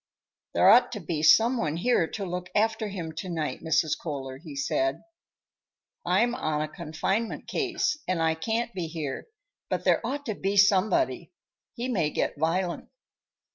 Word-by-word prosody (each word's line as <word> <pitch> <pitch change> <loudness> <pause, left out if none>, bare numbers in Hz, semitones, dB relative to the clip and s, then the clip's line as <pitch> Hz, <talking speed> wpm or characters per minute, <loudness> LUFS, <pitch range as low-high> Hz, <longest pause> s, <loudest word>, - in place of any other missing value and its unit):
"There - - +5
ought - - +7
to - - -4
be 160 -3 -3
some 225 +10 +5
one 160 -6 -1
here 190 -3 +2
to 200 +2 -5
look 180 0 -5
after 220 +1 +1
him 180 -5 -5
to 170 +4 -6
night, 160 -3 -3
Mrs. 160 -1 +1
Kohler," 135 -4 -6
he 155 -2 -10
said. 325 - -1 1.0
"I'm 240 0 +2
on 155 -9 -1
a - - -3
confinement 190 +9 -3
case, 370 -4 -1
and 185 -2 0
I 160 0 +2
can't 225 +8 -2
be 180 -3 -3
here, 155 - -5 0.4
but - - -1
there - - +3
ought 280 +5 -3
to 220 - -2
be 200 0 -2
somebody. 200 - +3 0.4
He 245 +1 -3
may 180 -12 +1
get - - -1
violent." 170 +3 -1
185 Hz, 165 wpm, -27 LUFS, 160-230 Hz, 1.0 s, ought